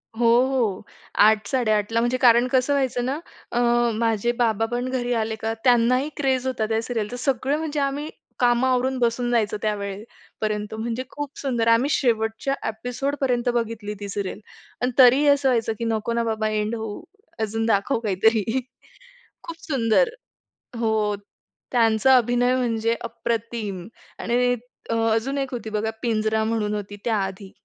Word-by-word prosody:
हो, 235 - 0 0.2
हो. 235 -8 0 0.4
8 215 +1 +5
8.30 225 -3 +1
म्हणजे 240 +2 +1
कारण 240 0 +5
कसं 260 +2 +2
व्हायचं 255 -3 0
ना, 275 +4 -2 0.3
अ, 240 - 0 0.4
माझे 225 0 +1
बाबापण 235 +2 0
घरी 245 -1 -1
आले 220 -1 -1
का 220 0 -3
त्यांना 245 0 +4
ही 280 +4 -2
क्रेज 265 -2 0
होता, 230 -4 -1
त्या 220 0 0
सिरियलचा 230 0 -3
सगळं 270 +2 0
म्हणजे 310 -2 -3
आम्ही 280 +2 -2 0.3
कामं 245 +1 +3
आवरून 260 +1 +1
बसून 240 +1 +1
जायचं 215 -3 +1
त्यावेळे 205 -1 -3 0.4
पर्यंत, 210 0 -2
म्हणजे 230 +3 -3
खूप 290 -1 -5
सुंदर 240 -5 -1
आम्ही 230 +5 +4
शेवटच्या 235 -1 0
एपिसोडपर्यंत 245 +2 -1
बघितली 225 -3 -2
ती 200 -1 -6
सीरियल 200 -1 -4 0.4
पण 250 +1 +1
तरीही 265 +3 +6
असं 280 -2 +4
व्हायचं, 230 -2 +1
की 230 - -2
नको 225 +1 -1
ना 235 0 +1
बाबा 220 -1 -1
एंड 215 +1 -1
होऊ 220 +3 -5 0.4
अजून 225 +1 -1
दाखव 225 +3 +1
काहीतरी. 220 +3 +1 0.8
खूप 335 0 -8
सुंदर. 270 - +2 0.7
हो. 220 -2 +1 0.6
त्यांचा 230 +1 +4
अभिनय 245 +1 +2
म्हणजे 230 -2 0
अप्रतिम 230 -4 -4 0.3
आणि 245 +1 +1 0.4
अ, - - 0 0.2
अजून 265 +5 -1
एक 270 -1 -2
होती 230 -2 -5
बघा 215 +1 -1
"पिंजरा" 220 -1 0
म्हणून 220 -2 -1
होती 205 0 -6
त्याआधी. 195 -3 -2
230 Hz, 150 wpm, -23 LUFS, 220-255 Hz, 0.8 s, तरीही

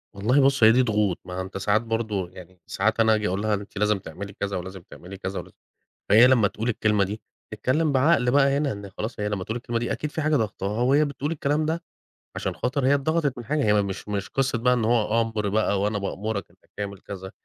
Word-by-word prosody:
والله 125 +8 +3
بُصّ 135 -2 +3
هي 110 - +9
دي 125 +3 +4
ضغوط. 105 -5 +1
ما 90 - -8
ع 90 - -3
أنت 95 +1 -6
ساعات 100 +3 +2
برضو 110 -5 -2
يعني 90 0 -14
ساعات 110 +4 0
أنا 110 -1 +5
آجي 105 -1 -1
أقول 95 +2 -1
لها: 110 0 0
"أنتِ 100 0 -5
لازم 105 0 +2
تعملي 100 +4 -8
كذا، 100 0 -3
ولازم 95 +1 -7
تعملي 95 +2 -10
كذا 95 0 -5
ولازم" - - -11 0.6
فهي 110 +4 +8
لمّا 120 -5 +4
تقول 115 +4 -4
الكلمة 105 -3 +2
دي 105 +3 -5 0.3
اتكلّم 135 +8 0
بعقل 135 -2 +3
بقى 140 +1 +4
هنا، 145 -2 0
إن 100 -1 -8
خلاص 110 0 -4
هي 105 - 0
لمّا 100 -3 -3
تقول 110 +4 -4
الكلمة 120 -1 -2
دي 120 - -2
أكيد 150 - -4
في 155 - -3
حاجة 155 0 +2
ضاغطاها 110 -1 -2
وهي 140 +4 +4
بتقول 145 +1 -3
الكلام 150 0 0
ده 165 +2 -2 0.5
عشان - - -3
خاطر 130 +1 -1
هي 140 - +5
اتضغطت 145 -1 0
من 120 - -7
حاجة، 150 +4 0
هي 105 0 +4
مش 100 0 -5
مش 100 -1 -3
قصّة 135 -3 0
بقى 125 +2 +3
إن 120 -3 0
هو 115 -1 +2
أمر 110 -2 -2
بقى 100 -1 +1
وأنا 105 +1 0
بأمرك 100 +1 -3
أنك - - -29
تعمل 100 -1 -5
كذا، 95 0 -8
110 Hz, 235 wpm, -25 LUFS, 100-130 Hz, 0.6 s, هي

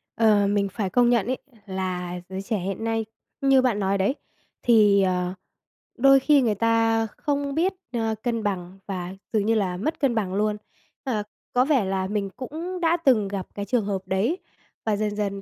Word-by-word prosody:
Ờ, 210 -3 +4
mình 200 0 +1
phải 200 -1 -3
công 240 +5 +4
nhận 235 -5 +3
ấy 255 +1 0 0.3
là 180 -2 -3
giới 190 0 -4
trẻ 210 +2 -2
hiện 195 +4 -4
nay, 225 -1 0 0.4
như 270 -1 +5
bạn 245 -5 +1
nói 195 0 +1
đấy, 195 +8 +1 0.5
thì, 210 -4 +5
ờ, 180 -1 0 0.6
đôi 275 +2 +6
khi 285 +1 +4
người 225 -4 +1
ta 225 +1 +2
không 285 -1 -1
biết, 355 +5 +2 0.2
ơ, 225 -2 0
cân 230 -3 -1
bằng 190 -2 -3
và 185 -2 -4 0.2
dường 210 -2 +2
như 225 +1 +3
là 185 -4 0
mất 310 - -2
cân 265 -4 +2
bằng 195 -4 -1
luôn. 210 +1 +1 0.5
Ờ, 225 -6 -1 0.3
có 250 +1 +4
vẻ 270 -8 +2
là 190 0 -1
mình 200 -1 -2
cũng 320 - -6
đã 335 0 +3
từng 225 -7 +4
gặp 195 -1 -4
cái 200 - -3
trường 215 0 +1
hợp 195 -2 -2
đấy, 200 - +1 0.5
và 215 - +2
dần 210 0 -1
dần 200 -1 -2
215 Hz, 195 wpm, -25 LUFS, 195-245 Hz, 0.6 s, đôi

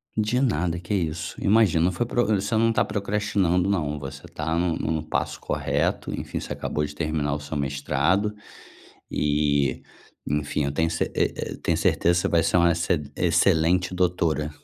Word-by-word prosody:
De 110 +3 +1
nada, 90 - 0
que 90 +4 -4
isso, 85 -5 -2
imagina, 100 -6 +4
não 90 - +2
foi 95 +7 -1
pro 120 0 +1
você 105 +1 0
não 115 +1 +3
tá - - +2
procrastinando 100 -3 0
não, 75 -7 0
você 70 0 -7
tá 80 +2 -3
no 85 -1 +1
no 80 0 -1
passo - - -2
correto, - - -1
enfim, - - -4
você - - -5
acabou 75 0 -2
de 75 - -7
terminar 75 -2 -1
o 75 - -2
seu 75 +1 -5
mestrado. 75 +8 0 0.8
E, 75 -2 +1 0.4
enfim, 75 0 -1
eu 70 - -1
tenho 80 +2 +1
ce 80 - 0
e - - +1
e - - -4
eu - - -9
tenho - - +1
certeza 85 - +2
que 90 - +3
você - - 0
vai 85 -1 +3
ser - - +1
uma 85 -1 +5
exce 85 0 0 0.2
excelente 90 +3 +2
doutora. 85 -4 0
85 Hz, 185 wpm, -25 LUFS, 75-95 Hz, 0.8 s, uma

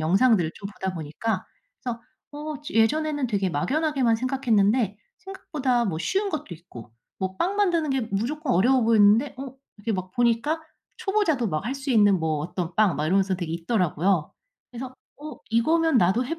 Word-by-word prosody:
영상들을 185 +1 +3
좀 200 - -7
보다 190 -2 -5
보니까. 180 +6 -3 0.4
그래서 235 -2 -4 0.3
어 300 +1 -5
저 295 - -8
예전에는 290 +5 +2
되게 200 -5 0
막연하게만 265 - +1
생각했는데 230 -4 +1 0.2
생각보다 305 -10 -2
뭐 165 -6 -2
쉬운 395 - 0
것도 310 - -4
있고 125 - -13 0.3
뭐 190 0 -3
빵 380 - -1
만드는 340 -7 +1
게 270 0 +1
무조건 260 +8 -1
어려워 250 +8 +4
보였는데 225 +3 +4
어 265 -1 -7 0.2
이렇게 220 +2 -2
막 185 -1 -4
보니까 240 +7 +1 0.4
초보자도 335 - 0
막 155 +2 -2
할 260 - -2
수 275 0 -5
있는 205 -5 +5
뭐 155 -1 0
어떤 175 +2 -4
빵 210 -5 +4
막 150 - -1
이러면서 190 +2 +2
되게 175 -3 -4
있더라고요. 175 -2 0 0.4
그래서 255 +1 -7 0.3
'어 305 0 -8
이거면 315 +5 +3
나도 195 +7 +2
해 330 +5 -4
230 Hz, 370 characters per minute, -25 LUFS, 190-285 Hz, 0.4 s, 있는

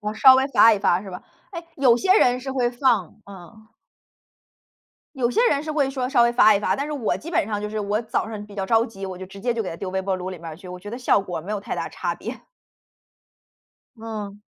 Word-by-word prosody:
我 210 0 -3
稍 260 +4 +8
微 265 +1 +2
发 230 -2 +6
一 210 - +1
发， 185 -2 +1
是 195 - -9
吧？ 180 - -8 0.3
诶， 340 -3 -7
有 255 -4 +4
些 380 - +4
人 250 0 +3
是 265 +1 -5
会 250 -2 0
放， 240 - 0
嗯。 200 +3 -14 1.5
有 245 -3 0
些 470 - +3
人 285 0 0
是 310 - -5
会 290 -3 +1
说 260 -2 -3
稍 255 -3 +4
微 235 0 +3
发 215 -3 +6
一 200 - 0
发， - - +1
但 280 - -3
是 300 - -5
我 265 -7 -1
基 335 - -9
本 315 - +1
上 210 -1 -3
就 210 - -4
是 215 +1 -4
我 210 +1 -1
早 220 -1 -2
上 215 -2 -7
比 205 - -14
较 195 -1 -3
着 225 +3 +3
急， 195 -3 -9
我 190 -1 -6
就 190 - -8
直 195 +1 -12
接 240 +4 0
就 230 -1 -2
给 185 - -5
它 165 - -6
丢 185 +2 -5
微 190 +1 -1
波 190 0 -2
炉 185 0 -5
里 185 - -8
面 165 - -11
儿 155 - -8
去， 185 +3 -14
我 180 0 -8
觉 205 - -10
得 230 - -5
效 250 -4 +2
果 185 -3 -5
儿 - - -8
没 200 +6 -5
有 210 - -2
太 - - -5
大 - - -3
差 - - -3
别。 - - -8 1.5
嗯。 210 -2 -7
220 Hz, 290 characters per minute, -23 LUFS, 195-250 Hz, 1.5 s, 稍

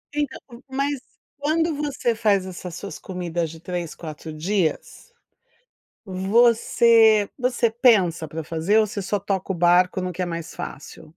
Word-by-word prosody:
Então, 295 -1 -2 0.3
mas 275 +1 -1 0.4
quando 320 +2 +1
você 280 -5 -1
faz 205 -4 +2
essas 180 -2 -7
suas 200 - -7
comidas 175 -3 -3
de 165 0 -11
3, 175 -2 -5
4 160 -1 -8
dias, 180 - -2 0.9
você 220 +2 +4
você 245 -2 +1
pensa 205 - +3
para 160 +1 -6
fazer 170 +8 +1
ou 215 - +2
você 205 - -5
só 205 +2 -1
toca 195 -1 -2
o - - -5
barco 180 +2 +3
no 180 0 -3
que 180 - -6
é - - -1
mais 170 -2 -6
fácil? 140 - -8
195 Hz, 150 wpm, -23 LUFS, 175-235 Hz, 0.9 s, você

